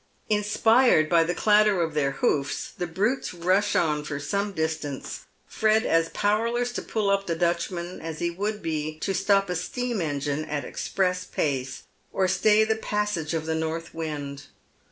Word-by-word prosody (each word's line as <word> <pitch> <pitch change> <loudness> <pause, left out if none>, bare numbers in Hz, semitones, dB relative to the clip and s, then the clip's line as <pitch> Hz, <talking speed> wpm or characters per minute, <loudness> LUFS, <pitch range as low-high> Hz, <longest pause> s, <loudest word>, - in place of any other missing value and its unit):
Inspired 210 -3 +4
by 170 -1 +5
the 175 +2 -2
clatter 210 -2 +4
of 165 -2 0
their 145 -2 +1
hoofs 140 +1 -1
the 175 - -3
brutes 205 +6 -1
rush 185 +4 +1
on 150 -3 +1
for 145 -1 -4
some 200 +8 -1
distance, 160 -5 -4 0.2
Fred 220 0 +2
as 165 0 +2
powerless 230 +4 0
to - - -4
pull 210 -3 -1
up 195 0 0
the 165 - 0
Dutchman 175 +1 -2
as 160 -1 -5
he 170 +1 -1
would 205 +4 -3
be 155 -1 -2
to 195 - -1
stop 195 +2 +2
a 180 - -2
steam 240 +5 -2
engine 145 -1 -2
at 145 -1 -3
express 180 -1 -1
pace, 135 -6 -2 0.3
or 190 - +1
stay 210 +3 +4
the 220 0 0
pas 210 -1 -1
sage 165 -4 -2
of 160 -1 -2
the 160 - -1
north 160 +1 -3
wind. 145 -4 -5
175 Hz, 175 wpm, -26 LUFS, 155-210 Hz, 0.3 s, by